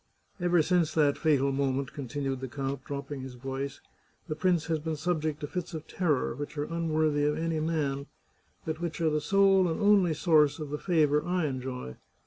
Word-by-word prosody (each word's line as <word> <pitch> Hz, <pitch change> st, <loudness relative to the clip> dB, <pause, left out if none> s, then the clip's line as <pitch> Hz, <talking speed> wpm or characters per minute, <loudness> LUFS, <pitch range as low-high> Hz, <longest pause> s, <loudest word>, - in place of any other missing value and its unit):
Ever 175 Hz, -2 st, +3 dB
since 175 Hz, -1 st, +1 dB
that 145 Hz, -3 st, +4 dB
fatal 140 Hz, -3 st, +2 dB
moment," 135 Hz, 0 st, -1 dB
continued 135 Hz, 0 st, -3 dB
the 130 Hz, -, -4 dB
count, 135 Hz, +1 st, -4 dB
dropping 140 Hz, 0 st, -5 dB
his 130 Hz, -1 st, -8 dB
voice, 135 Hz, +2 st, -5 dB, 0.2 s
" -, -, -38 dB
the 155 Hz, -, -3 dB
prince 175 Hz, 0 st, +1 dB
has 160 Hz, -1 st, 0 dB
been 160 Hz, +1 st, -3 dB
subject 155 Hz, -1 st, -1 dB
to 145 Hz, -, -3 dB
fits 180 Hz, +2 st, -5 dB
of 155 Hz, -, -6 dB
terror 155 Hz, -11 st, 0 dB
which 145 Hz, +4 st, -7 dB
are 145 Hz, -, 0 dB
unworthy 155 Hz, -2 st, 0 dB
of 150 Hz, +1 st, +1 dB
any 165 Hz, 0 st, -1 dB
man, 145 Hz, -3 st, -1 dB, 0.6 s
but 160 Hz, +1 st, -3 dB
which 170 Hz, -1 st, -3 dB
are 160 Hz, -2 st, +2 dB
the 150 Hz, 0 st, 0 dB
sole 195 Hz, 0 st, +4 dB
and 165 Hz, -, -2 dB
only 200 Hz, -6 st, +4 dB
source 150 Hz, -3 st, +4 dB
of 150 Hz, -2 st, -6 dB
the 150 Hz, -, -3 dB
favour 150 Hz, -5 st, +2 dB
I 175 Hz, -1 st, 0 dB
enjoy. 130 Hz, -, -4 dB
150 Hz, 195 wpm, -29 LUFS, 140-165 Hz, 0.6 s, that